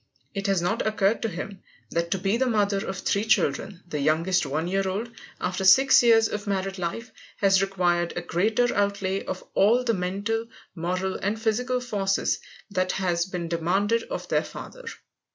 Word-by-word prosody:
It 200 -1 -3
has 195 -3 +1
not 215 +5 0
occurred 215 0 +1
to 225 - -1
him 195 +1 -7 0.3
that 170 0 -1
to 195 - 0
be 195 +3 0
the 260 +2 +1
mother 205 -4 +1
of 190 - -4
three 200 +2 0
children, 195 -2 0
the 150 -3 -3
youngest 165 +5 +2
one 155 +4 -2
year 195 +1 0
old, 220 +5 -3 0.3
after 180 +1 -2
six 265 +8 +7
years 225 -2 +5
of 210 0 -5
married 195 -1 -2
life, 225 +7 -4 0.3
has 195 -1 +4
required 175 -3 +1
a 175 - -2
greater 215 +8 +1
outlay 200 -1 0
of 185 - -5
all 230 +6 +4
the 235 -2 +1
mental, 200 +5 -2 0.3
moral, 185 +2 -2
and 205 +3 -2
physical 250 +3 0
forces 200 -6 0 0.3
than 185 -1 0
has 175 -2 0
been 180 -3 -4
demanded 190 +7 +1
of - - -5
their - - +1
father. - - -10
195 Hz, 175 wpm, -25 LUFS, 180-220 Hz, 0.3 s, six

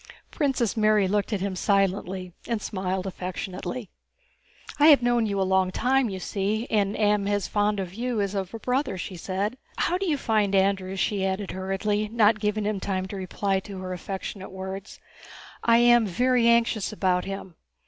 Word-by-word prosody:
Princess 265 -7 0
Mary 215 -2 +3
looked 205 +3 0
at 205 -4 -1
him 195 -1 -2
silently 190 -2 0
and 230 -2 -1
smiled 190 -2 -3
affectionately. 185 +4 -5 0.9
"I 295 - +7
have 285 -5 +7
known 240 -2 +2
you 200 -1 -1
a - - +3
long 190 0 +2
time, 250 +5 +1
you 190 -1 -5
see, 205 +5 -1
and 205 -2 +1
am 210 -1 +2
as 205 -1 0
fond 205 0 +1
of 185 -2 -4
you 240 +1 -2
as 200 -1 -1
of 195 -2 -3
a 225 - -5
brother," 250 -3 -1
she 185 +1 -5
said. 195 +7 -3 0.2
"How 360 +1 +1
do 390 - -2
you 305 -4 +1
find 215 -6 +1
Andrew?" 190 -1 +1
she 195 +1 0
added 190 +1 -2
hurriedly, 205 +3 -1
not 215 -1 +3
giving 210 0 -1
him 210 -1 -1
time 190 -1 -2
to 200 - -6
reply 195 +1 -1
to 195 0 -9
her 185 0 -5
affectionate 190 +1 -6
words. 190 +1 -7 0.6
"I 230 0 +5
am 240 -2 +5
very 245 +5 +2
anxious 235 -3 +2
about 185 -3 +1
him. 195 -2 -6
200 Hz, 180 wpm, -26 LUFS, 190-225 Hz, 0.9 s, I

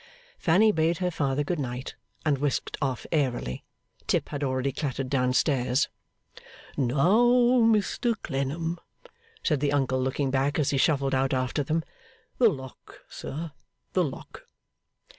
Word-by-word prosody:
Fanny 200 +6 +4
bade 165 -2 +1
her 180 0 -1
father 140 -3 0
good 160 +3 -2
night, 125 -1 -4 0.3
and 145 -3 +2
whisked 145 -2 -1
off 130 -3 -2
airily. 125 - -1 0.4
Tip - - 0
had 145 -1 -4
already 130 0 0
clattered 135 -2 -3
down 125 -2 +2
stairs. 130 0 +2 0.9
'Now, 155 - +3 0.4
Mr 225 +2 +1
Clennam,' 160 +6 -2 0.6
said 150 -5 +1
the 145 0 +1
uncle, 130 -2 +1
looking 130 +1 -1
back 135 +2 +1
as 150 -4 +1
he 135 - +1
shuffled 140 -2 +2
out 135 0 +1
after 130 +3 -1
them, 160 +4 -1 0.6
'the 240 -3 +7
lock, 130 -7 -9
sir, 160 +3 -6 0.4
the 185 - +3
lock. 140 -5 -7
140 Hz, 140 wpm, -27 LUFS, 130-160 Hz, 0.9 s, the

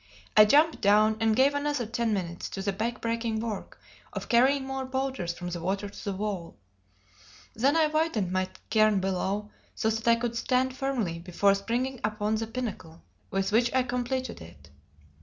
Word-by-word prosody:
I 215 - +9
jumped 300 +8 +4
down 215 +2 +4
and 225 -1 +2
gave 270 +4 +4
another 285 -3 -1
ten 230 0 -1
minutes 175 -4 -3
to 195 - -5
the 200 0 0
back 230 +5 -3
breaking 230 -1 -1
work 220 -3 -5 0.3
of - - -6
carrying 265 +3 +4
more 270 0 -3
boulders 260 -8 -2
from 175 -1 -5
the 175 -1 -5
water 195 +3 -2
to - - -11
the 200 - -2
wall. 195 -4 -4 1.0
Then 270 +7 +2
I 320 - +5
widened 305 - 0
my 185 0 0 0.2
cairn 215 -2 +4
below, 195 +2 -2 0.2
so 220 - +1
that 225 +1 -3
I 230 - +7
could 235 0 -3
stand 255 +2 +1
firmly 245 -11 -2
before 185 +3 +2
springing 240 +6 -2
upon 215 0 -1
the 220 +1 -1
pinnacle 215 -9 -6 0.3
with 195 +1 -1
which 235 +3 +3
I 260 - +4
completed 250 - -3
it. 75 -4 -14
220 Hz, 175 wpm, -28 LUFS, 195-255 Hz, 1.0 s, I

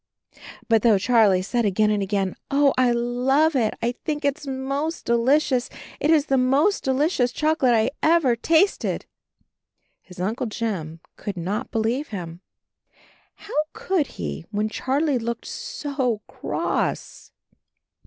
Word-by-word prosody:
But 225 -2 +4
though 225 -3 +5
Charlie 205 -3 +3
said 235 +4 0
again 210 +1 +2
and 210 -1 0
again, 195 -1 -1 0.2
"Oh, 280 0 +3
I 255 -1 +3
love 250 +6 +2
it; 225 -5 +1
I 235 - +2
think 295 -1 -3
it's 285 +1 -1
most 275 +4 -3
delicious. 255 +2 +2 0.3
It 295 - 0
is 310 -3 +4
the 270 -3 +2
most 280 +11 +2
delicious 265 -1 +1
chocolate 305 -4 +2
I 220 +2 +2
ever 315 -7 +3
tasted," 330 - +1 1.0
his 180 -2 -15
Uncle 225 +7 -2
Jim 185 -8 -4 0.2
could 200 -3 -5
not 200 +9 -3
believe 235 +5 -1
him 175 -4 -7 0.5
— - - -32
how - - -9 0.2
could 385 -9 0
he 75 -2 -4
when 210 +1 -1
Charlie 270 +4 0
looked 235 0 -4
so 260 -7 -3
cross? - - -3
245 Hz, 135 wpm, -23 LUFS, 215-285 Hz, 1.0 s, though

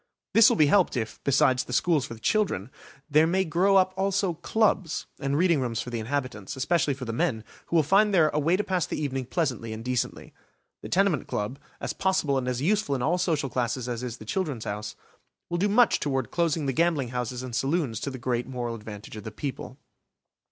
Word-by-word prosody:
This 225 -1 +8
will - - +2
be 155 - +6
helped 175 -1 +3
if, 110 -2 -4
besides 130 -2 +3
the 125 - -8
schools 150 -2 +2
for 115 - -7
the - - -15
children, 135 - 0 0.4
there 155 +1 +4
may 190 +3 +1
grow 180 +5 +2
up 185 -1 +4
also 195 -1 0
clubs 190 0 0
and 140 0 -1
reading 170 -4 +3
rooms 115 -3 -2
for 125 - -5
the 120 - -2
inhabitants, 120 -4 -3
especially 140 +1 +1
for 130 -1 -7
the 115 - -4
men, 120 -5 0 0.2
who - - -2
will 160 - +5
find 200 +7 +4
there 165 -5 +4
a 150 - -1
way 165 +5 +2
to 210 - 0
pass 185 -5 -1
the - - -3
evening 135 -3 -2
pleasantly 125 - -2
and 110 +2 -8
decently. 125 -1 -2 0.5
The - - -8
tenement 190 -5 +2
club, 105 +7 -3 0.2
as - - -3
possible 185 -8 +1
and 125 - -4
as 125 +1 -1
useful 195 -5 +1
in 125 - -2
all 170 +6 +1
social 160 -6 0
classes 125 0 -2
as 120 -1 -3
is 125 -1 -5
the 110 - -11
"Children's 145 - -2
House", 105 +1 -4 0.6
will 175 - 0
do 205 +3 +2
much 230 +2 +4
toward 135 -4 -2
closing 165 -3 0
the 135 - 0
gambling 155 -4 +1
houses 125 0 -3
and 125 -2 -5
saloons 135 - 0
to - - -3
the 130 - -6
great 125 -1 -2
moral 120 -2 -3
advantage 105 -1 -9
of 105 - -8
the 110 - -5
people. 130 +2 -6
140 Hz, 220 wpm, -26 LUFS, 125-175 Hz, 0.6 s, This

